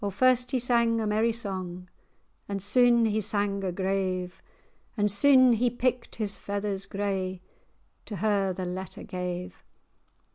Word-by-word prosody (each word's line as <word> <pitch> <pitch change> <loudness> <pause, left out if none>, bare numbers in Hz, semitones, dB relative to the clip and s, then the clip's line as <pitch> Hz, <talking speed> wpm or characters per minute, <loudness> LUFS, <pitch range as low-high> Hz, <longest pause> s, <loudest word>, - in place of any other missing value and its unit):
O 200 - 0
first 250 +4 +3
he 265 - 0
sang 235 -2 +2
a 220 - -1
merry 215 +2 +1
song, 185 -5 -5 0.6
And 200 -1 -2
syne 235 +3 +4
he 215 0 0
sang 200 -1 -1
a 185 - -1
grave; 185 -1 -2 0.6
And 205 -1 +2
syne 255 +3 +6
he 240 +2 +2
picked 250 0 -2
his 210 -3 -2
feathers 200 -1 -3
grey, 190 -2 -3 0.6
To 210 - -6
her 200 0 +1
the 185 0 -4
letter 185 +1 -6
gave. 180 -1 -6
205 Hz, 145 wpm, -27 LUFS, 190-230 Hz, 0.6 s, syne